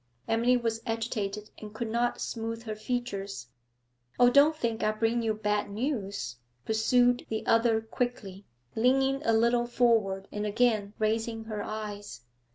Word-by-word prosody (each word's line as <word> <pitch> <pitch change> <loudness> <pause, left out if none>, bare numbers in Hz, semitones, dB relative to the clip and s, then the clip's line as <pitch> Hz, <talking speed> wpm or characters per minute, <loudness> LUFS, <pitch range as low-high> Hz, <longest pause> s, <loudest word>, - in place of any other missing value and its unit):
Emily 235 +2 +3
was 225 -2 -2
agitated 215 -2 -3
and 215 0 -10
could 230 +1 -3
not 240 +1 0
smooth 230 0 -4
her 220 -2 -4
features. 210 - -4 0.7
'Oh, 245 0 +7
don't 285 +4 +6
think 230 -6 -2
I 215 - +2
bring 225 +2 0
you 220 -1 0
bad 210 -1 -1
news!' 200 - -3 0.3
pursued 245 +3 +3
the 220 -1 -3
other 230 -1 +3
quickly, 220 -4 -4 0.3
leaning 270 +4 +2
a 230 - +2
little 235 +2 +3
forward 220 -6 +2
and 210 - -3
again 210 -1 +1
raising 225 +1 -1
her 215 -2 -5
eyes. 205 - -6
225 Hz, 145 wpm, -29 LUFS, 210-240 Hz, 0.7 s, Oh